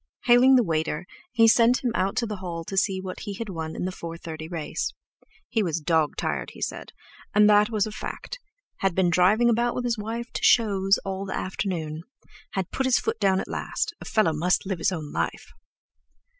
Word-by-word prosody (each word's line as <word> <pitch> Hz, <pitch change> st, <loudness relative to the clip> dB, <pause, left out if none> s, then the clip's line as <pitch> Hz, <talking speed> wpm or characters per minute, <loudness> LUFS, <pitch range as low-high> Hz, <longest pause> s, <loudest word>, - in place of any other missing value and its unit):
Hailing 250 Hz, +2 st, +6 dB
the 250 Hz, -, +5 dB
waiter, 160 Hz, -1 st, -1 dB, 0.3 s
he 230 Hz, -2 st, +5 dB
sent 235 Hz, +3 st, +4 dB
him 245 Hz, -, +1 dB
out 195 Hz, -3 st, 0 dB
to 240 Hz, -, +1 dB
the 215 Hz, -2 st, -4 dB
hall 175 Hz, -3 st, -5 dB
to 195 Hz, -, -6 dB
see 195 Hz, -1 st, +1 dB
what 185 Hz, -1 st, -6 dB, 0.2 s
had 230 Hz, -2 st, -5 dB
won 160 Hz, -3 st, -5 dB
the 185 Hz, -, -3 dB
4.30 165 Hz, -2 st, -7 dB
race. 165 Hz, -3 st, -3 dB, 0.6 s
He 225 Hz, -, 0 dB
was 170 Hz, -4 st, -1 dB
dog 160 Hz, -1 st, +1 dB
tired, -, -, -2 dB
he -, -, -11 dB
said, -, -, -5 dB, 0.4 s
and 210 Hz, 0 st, +6 dB
that 210 Hz, 0 st, +5 dB
was 215 Hz, -3 st, +1 dB
a 215 Hz, -, -6 dB
fact; 485 Hz, -, -7 dB, 0.4 s
had 195 Hz, -3 st, 0 dB
been 185 Hz, -2 st, +3 dB
drivin' 195 Hz, +7 st, +4 dB
about 235 Hz, +1 st, +2 dB
with 250 Hz, -, -2 dB
his 240 Hz, -2 st, -1 dB
wife 230 Hz, +3 st, -5 dB
to -, -, -3 dB
"shows" 195 Hz, -4 st, +4 dB
all 195 Hz, 0 st, -3 dB
the 185 Hz, -, -3 dB
afternoon. 165 Hz, -5 st, -3 dB, 0.5 s
Had 190 Hz, -3 st, -3 dB
put 265 Hz, -, 0 dB
his 255 Hz, -, +4 dB
foot -, -, -2 dB
down 195 Hz, -2 st, +3 dB
at -, -, -4 dB
last. -, -, -3 dB
A -, -, -8 dB
fellow 210 Hz, -7 st, +2 dB
must 175 Hz, +6 st, +1 dB
live 190 Hz, -2 st, -3 dB
his 195 Hz, +4 st, +1 dB
own 155 Hz, -5 st, -5 dB
life. -, -, -3 dB
195 Hz, 200 wpm, -25 LUFS, 170-225 Hz, 0.6 s, Hailing